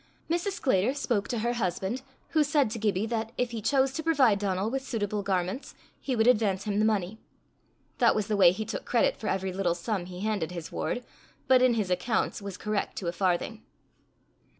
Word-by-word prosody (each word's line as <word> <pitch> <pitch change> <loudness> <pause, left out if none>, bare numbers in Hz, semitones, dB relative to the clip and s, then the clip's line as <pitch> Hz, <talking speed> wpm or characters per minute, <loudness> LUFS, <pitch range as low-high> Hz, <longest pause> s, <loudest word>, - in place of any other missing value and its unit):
Mrs. 350 +4 0
Sclater 255 - +1
spoke 235 -7 -1
to 240 - -2
her 240 - +1
husband, 195 +2 -2 0.3
who 310 -1 +3
said 285 -5 +2
to 225 - -4
Gibbie 210 -1 +1
that, 225 -1 -2
if 250 -1 0
he 230 -2 -4
chose 265 +3 +2
to 315 - -3
provide 270 -10 +3
Donal 195 +1 -1
with 270 +1 -1
suitable 210 -5 -2
garments, 190 +5 -2 0.2
he 265 - -2
would 220 -1 +3
advance 210 -6 +3
him 205 0 -1
the 215 - +3
money: 215 -1 0 0.8
that - - +5
was 215 - 0
the 215 0 -1
way 190 -4 +7
he 215 +4 -4
took - - -4
credit - - +2
for - - -6
every 190 -1 -1
little 180 -3 0
sum 180 0 -3
he 180 0 -8
handed 205 -6 -1
his 170 -3 -7
ward, 245 - -2 0.4
but 260 -1 +6
in 255 -2 +4
his 205 -5 -1
accounts 205 +5 0
was 200 -2 -6
correct 210 -2 -2
to 185 - -4
a - - -1
farthing. 190 +5 -1
215 Hz, 205 wpm, -28 LUFS, 190-245 Hz, 0.8 s, way